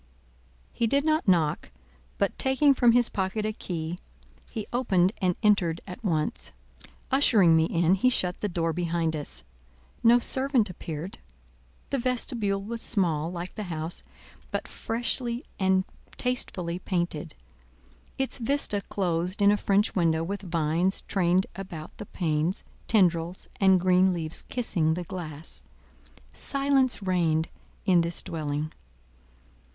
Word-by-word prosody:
He 230 - +1
did 280 +5 +2
not 310 -4 +1
knock, 165 -5 +2 0.5
but 200 - 0
taking 275 +2 +4
from 240 -3 +4
his 240 -1 +4
pocket 195 +2 -2
a 215 - -1
key, 170 -3 -5 0.5
he 220 -3 -5
opened 190 -7 +2
and 180 -2 +2
entered 180 -6 +3
at 190 +5 -9
once. 155 -6 -1 0.6
Ushering 215 - +5
me 160 0 +4
in, 170 +1 +2
he 195 +7 +3
shut 180 -7 0
the 210 - -2
door 165 -2 -1
behind 170 -2 -1
us. 105 - -6 0.6
No 235 +1 +7
servant 255 -4 +1
appeared. 170 +5 -6 0.7
The 275 - +1
vestibule 235 -5 -1
was 230 +2 -2
small, 170 -6 +2
like 175 0 -6
the 210 - -5
house, 160 +1 -2 0.5
but - - -3
freshly 240 +1 -1
and 190 -1 +3 0.3
tastefully 185 -9 -1
painted; 170 -4 -3 0.8
its 265 0 0
vista 235 -4 +1
closed 180 -1 -2
in 200 0 +6
a - - +4
French 205 +1 +1
window 165 -3 +2
with 200 +4 -4
vines 170 +1 0
trained 185 -1 +2
about 170 -5 -8
the 210 - -7
panes, 160 +1 -1 0.2
tendrils, 175 -4 +1
and 190 -2 +5
green 185 +1 +4
leaves 160 -2 -3
kissing 170 -10 0
the 180 - -4
glass. 165 -3 -8 0.7
Silence 275 -5 +1
reigned 165 -4 +1 0.4
in 180 -4 +5
this 170 +1 -1
dwelling. 155 -1 -3
185 Hz, 135 wpm, -27 LUFS, 165-225 Hz, 0.8 s, No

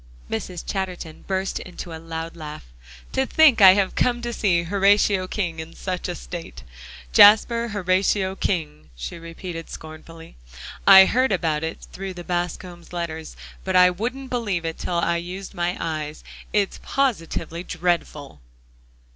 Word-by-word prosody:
Mrs. 175 +10 -4
Chatterton 180 -5 -5
burst 190 0 -1
into 180 -2 -8
a 160 - -7
loud 165 0 -6
laugh. 155 - -8 0.5
"To 265 0 0
think 295 -8 +5
I 190 -1 +10
have 200 -2 +1
come 240 -1 +1
to 240 0 -3
see 175 -6 +1
Horatio 200 +1 +3
King 175 -5 -3
in 160 +1 -8
such 185 -2 -4
a - - -3
state! - - -8 0.5
Jasper 230 +3 +6
Horatio 190 -1 +1
King!" 155 -7 -3
she - - -7
repeated 165 0 -8
scornfully. 160 - -11 0.5
"I 190 -1 +10
heard 255 +4 +2
about 160 -5 0
it 160 - -5
through 190 -1 -6
the 175 - -8
Bascombs' 175 0 -4
letters, 160 -2 -5 0.3
but 190 -1 -2
I 180 0 +7
wouldn't 250 +8 -5
believe 205 -9 -1
it 165 0 -4
till 175 - -3
I 170 0 +1
used 185 +3 -7
my 175 +1 -2
eyes. 155 -2 -4 0.3
It's 205 -2 0
positively 170 -10 -2
dreadful!" 165 - -2
180 Hz, 145 wpm, -23 LUFS, 165-195 Hz, 0.5 s, I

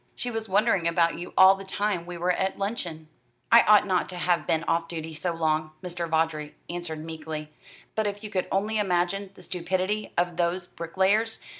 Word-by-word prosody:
She 245 - -4
was 225 -2 -4
wondering 195 -3 +3
about 170 0 +2
you 175 - -7
all 190 0 +9
the 195 0 -7
time 195 -2 -1
we 175 -1 -6
were 175 +2 +1
at 190 +1 -1
luncheon." 175 -6 -4 0.4
"I 230 0 +9
ought 210 -1 +6
not 185 -2 0
to 180 - -6
have 175 0 +1
been 160 0 +1
off 165 0 0
duty 160 -1 -5
so 170 +3 -2
long," 155 -1 0
Mr. 175 -2 -4
Vawdrey 160 -2 0 0.2
answered 160 -3 -5
meekly; 155 -1 -6 0.4
"but 220 -1 0
if 205 +1 -4
you 210 - -7
could 185 -3 -1
only 210 +3 0
imagine 190 0 0
the - - -14
stupidity 185 +4 -2
of 175 -1 +1
those 175 +1 0
bricklayers! 190 +7 0
175 Hz, 190 wpm, -26 LUFS, 165-195 Hz, 0.4 s, all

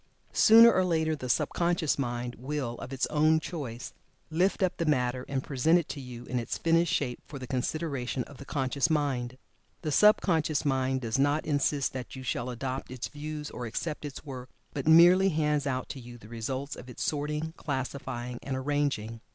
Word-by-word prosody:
Sooner 230 +1 +8
or 185 - +3
later, 160 -3 +1
the 130 -4 -6
sub - - +2
conscious 170 -4 0
mind 120 -2 -2
will, 135 -2 -3
of 130 - -8
its 135 -1 0
own 155 +1 +4
choice, 130 -6 -6 0.4
lift 185 +5 +2
up 185 - +1
the 170 - -1
matter 125 -3 0
and 135 -1 -1
present 150 +5 +3
it 170 - -1
to 140 - -5
you 125 -2 -9
in 125 -1 -2
its 115 - -3
finished 165 0 +2
shape 125 -4 -1
for 145 - -8
the 130 - -6
consideration 130 -1 -2
of 140 - -14
the - - -9
conscious 140 +2 0
mind. 130 -5 0 0.5
The 155 - -1
sub 210 +8 +6
conscious 155 -5 0
mind 130 -1 +1
does 115 +2 -1
not 145 +2 +2
insist 145 -1 +1
that 130 0 -6
you 130 - -7
shall 125 0 -2
adopt 130 +2 -4
its 130 -2 -5
views, 150 0 -6
or 120 - -5
accept 150 +8 -4
its 145 0 -7
work, 130 -3 -7 0.2
but 140 -1 -4
merely 175 +4 +7
hands 150 -3 +1
out 130 -1 -2
to 135 - -6
you 120 -1 -10
the 110 - -14
result 130 +5 -4
of 125 - -11
its 125 - -5
sorting, 150 +2 -2
classifying 130 -4 -4
and 135 -1 -3
arranging. 130 -5 -1
140 Hz, 195 wpm, -29 LUFS, 125-155 Hz, 0.5 s, Sooner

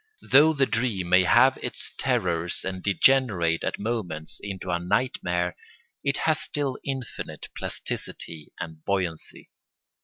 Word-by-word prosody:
Though 150 +4 +7
the 140 -3 +3
dream 110 -8 -1
may 90 +1 +6
have - - +5
its - - -3
terrors 85 +1 0
and 95 -1 -3
degenerate 100 -5 +3
at - - -1
moments 100 -9 -3
into 95 -3 -4
a 85 - +1
nightmare, 90 -3 0 0.5
it 140 0 +1
has 155 -1 +3
still 140 -3 -2
infinite 135 -4 -5
plasticity 80 -3 -5
and 80 -2 -7
buoyancy. 90 -5 -2
95 Hz, 125 wpm, -26 LUFS, 85-130 Hz, 0.5 s, Though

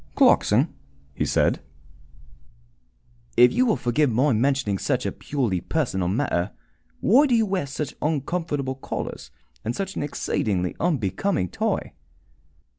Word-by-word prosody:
"Clarkson," - - +4 0.4
he - - -1
said, - - +2 1.8
"if 125 +1 +7
you 255 +2 +3
will 220 - +3
forgive 135 +4 +1
my 130 +4 +2
mentioning 115 -4 +1 0.3
a - - 0
purely 120 -11 -2
personal 115 - -1
matter, 95 -3 0 0.5
why 275 +8 +5
do 250 - +3
you 225 -1 +3
wear 190 -7 -1
such 140 +1 -4
uncomfortable 150 -2 -1
collars 130 - -6 0.3
and 115 +2 -2
such 195 -1 -4
an - - -2
exceedingly 100 -10 -1
unbecoming 150 - 0
tie?" - - -2
140 Hz, 120 wpm, -24 LUFS, 110-170 Hz, 1.8 s, if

